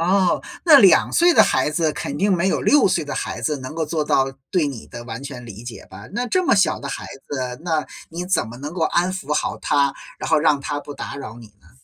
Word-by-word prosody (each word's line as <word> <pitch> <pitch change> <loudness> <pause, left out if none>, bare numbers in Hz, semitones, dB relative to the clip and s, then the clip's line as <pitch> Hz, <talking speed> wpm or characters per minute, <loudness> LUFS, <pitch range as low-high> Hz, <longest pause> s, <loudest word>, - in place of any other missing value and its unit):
哦， 185 +1 +2 0.2
那 310 -5 +9
2 190 -4 +5
岁 345 +1 +5
的 - - +7
孩 130 +3 +1
子 155 0 0
肯 145 -1 -5
定 200 +3 +2
没 180 +1 +2
有 - - 0
6 290 -7 +5
岁 175 -4 0
的 150 - -5
孩 - - -4
子 150 -2 -1
能 130 +3 -8
够 160 -1 -2
做 155 0 -1
到 135 -2 +1 0.2
对 175 -5 +2
你 135 -6 -6
的 120 0 -9
完 115 +2 -7
全 130 -3 -8
理 110 -1 -10
解 120 -1 -9
吧？ 100 +3 -12
那 245 +4 -2
这 370 +9 +1
么 - - +4
小 180 -5 +2
的 140 - -6
孩 - - -5 0.2
子， 130 -2 -4
那 160 -3 0 0.2
你 175 +2 -5
怎 185 -10 0
么 120 - -9
能 145 +5 -7
够 175 - -2
安 175 +3 +1
抚 150 -6 -4
好 150 - -1
他， 140 -1 +1 0.2
然 - - -4
后 160 - +4
让 150 -2 +2
他 145 +1 -3
不 145 - -9
打 - - -6
扰 115 -5 -8
你 115 - -12
呢？ - - -22
150 Hz, 265 characters per minute, -21 LUFS, 135-180 Hz, 0.2 s, 那